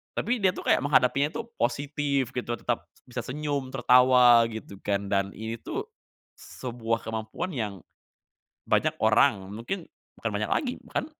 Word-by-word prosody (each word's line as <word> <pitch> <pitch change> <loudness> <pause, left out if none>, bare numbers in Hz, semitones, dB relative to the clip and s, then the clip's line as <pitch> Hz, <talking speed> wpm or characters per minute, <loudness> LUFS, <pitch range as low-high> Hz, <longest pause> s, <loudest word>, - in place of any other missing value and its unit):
tapi 245 +2 0
dia 190 - +5
itu - - -5
kayak - - +4
menghadapinya 140 0 +3
tuh 235 0 -5
positif 140 +1 0
gitu, 120 -1 -3
tetap 120 -1 -2
s - - -27
bisa 125 0 -4
senyum, 140 -1 -3
tertawa 125 -2 +6
gitu 110 -3 -8
kan, 100 0 0
dan 100 0 +1
ini 110 +1 -4
tuh, 420 - -5 0.5
sebuah 115 -2 -4
kemampuan 110 +10 -4
yang, 105 -6 -3 0.9
banyak - - +2
orang, 95 -2 +4
mungkin 160 - -5 0.3
bukan - - -1
banyak - - -1
lagi, 255 -5 +1
bahkan 270 - -2
125 Hz, 150 wpm, -27 LUFS, 110-145 Hz, 0.9 s, tertawa